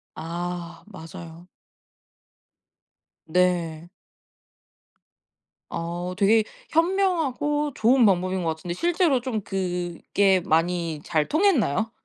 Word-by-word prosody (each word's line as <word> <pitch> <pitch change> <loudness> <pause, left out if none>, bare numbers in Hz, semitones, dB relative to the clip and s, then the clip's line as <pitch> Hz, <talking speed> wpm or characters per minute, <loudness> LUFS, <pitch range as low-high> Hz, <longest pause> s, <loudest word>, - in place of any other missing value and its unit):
아 175 +1 -5
맞아요. 165 -2 -11 1.8
네. 175 -1 0 1.8
아 175 +2 -4
되게 215 +2 +4 0.3
현명하고 320 -5 +1
좋은 240 +3 +4
방법인 185 -2 +1
것 160 -1 -1
같은데 175 +2 -6
실제로 340 - +1
좀 235 -4 -3
그게 185 0 0
많이 165 -2 0
잘 155 -3 0
통했나요? 255 - +2
180 Hz, 170 characters per minute, -24 LUFS, 170-250 Hz, 1.8 s, 되게